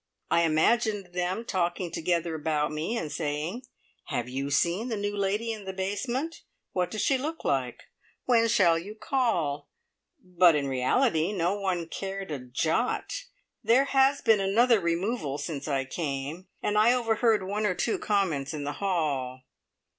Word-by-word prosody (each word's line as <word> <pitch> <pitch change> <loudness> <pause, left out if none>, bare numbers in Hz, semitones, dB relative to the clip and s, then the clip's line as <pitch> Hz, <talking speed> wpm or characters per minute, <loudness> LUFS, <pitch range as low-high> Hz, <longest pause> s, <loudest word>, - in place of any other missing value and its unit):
I 170 - +4
imagined 200 +4 +1
them 180 +5 -2
talking 175 -3 -1
together 170 0 -1
about 150 -1 -1
me, 155 +10 -2
and 155 -8 -4
saying, 160 - -3 0.4
"Have 120 0 -3
you 135 +2 -3
seen 170 - +1
the 225 -3 -2
new 205 0 -2
lady 205 +3 0
in 210 -3 -9
the 190 - -4
basement? 240 +11 -3 0.3
What 180 -1 0
does 215 +2 -2
she 270 -2 +2
look 315 +4 -5
like? 130 -3 -1 0.4
When 230 -2 +4
shall 170 -6 +4
you 205 +6 -8
call?" 175 - -1 0.5
but 180 - +4
in 145 -2 0
reality 160 - +2
no 175 -1 +1
one 185 -4 -1
cared 195 0 -5
a 145 - -3
jot. 160 - -1 0.4
There 255 +4 +4
has 275 0 +3
been 220 -2 +5
another 220 +4 +4
removal 170 - -1
since 145 -1 -5
I 135 -2 0
came, 145 +4 -4 0.2
and 210 0 +2
I 230 +3 +6
overheard 225 -3 +2
one 210 +2 -1
or 185 - 0
two 225 - 0
comments 165 -9 0
in 145 - -4
the 145 +1 -3
hall. 140 -9 -1
185 Hz, 160 wpm, -28 LUFS, 155-220 Hz, 0.5 s, I